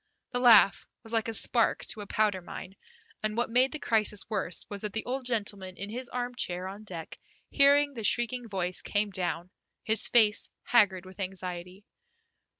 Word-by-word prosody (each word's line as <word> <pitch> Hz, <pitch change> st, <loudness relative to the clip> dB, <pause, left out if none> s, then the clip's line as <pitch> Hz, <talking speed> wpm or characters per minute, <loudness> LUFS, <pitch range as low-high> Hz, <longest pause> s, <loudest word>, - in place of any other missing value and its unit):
The 245 Hz, -, -1 dB
laugh 220 Hz, -7 st, +6 dB, 0.2 s
was 225 Hz, -, -8 dB
like 225 Hz, -1 st, +1 dB
a -, -, -2 dB
spark 230 Hz, +2 st, +4 dB
to 215 Hz, -, -4 dB
a 205 Hz, -, -8 dB
powder 205 Hz, -3 st, 0 dB
mine, 185 Hz, +2 st, -9 dB, 0.5 s
and 215 Hz, +1 st, -2 dB
what 240 Hz, 0 st, -1 dB
made 255 Hz, +3 st, +3 dB
the 305 Hz, -, -4 dB
crisis 215 Hz, -6 st, 0 dB
worse 190 Hz, -4 st, -2 dB
was 205 Hz, -1 st, -7 dB
that 210 Hz, -2 st, -5 dB
the 220 Hz, -, -4 dB
old 255 Hz, +1 st, -3 dB
gentleman 205 Hz, -5 st, -3 dB
in 200 Hz, +1 st, -6 dB
his 250 Hz, +2 st, -5 dB
armchair 245 Hz, -8 st, -3 dB
on 200 Hz, +3 st, -9 dB
deck, 170 Hz, -5 st, -8 dB, 0.3 s
hearing 285 Hz, 0 st, +4 dB
the 230 Hz, -4 st, -7 dB
shrieking 240 Hz, +2 st, 0 dB
voice, 185 Hz, -2 st, -3 dB
came 205 Hz, 0 st, -1 dB
down, 175 Hz, -1 st, -3 dB, 0.3 s
his 220 Hz, -1 st, +2 dB
face 215 Hz, -3 st, +4 dB
haggard 195 Hz, -6 st, +3 dB
with 185 Hz, +2 st, -14 dB
anxiety. 185 Hz, 0 st, -6 dB
210 Hz, 175 wpm, -28 LUFS, 190-240 Hz, 0.5 s, laugh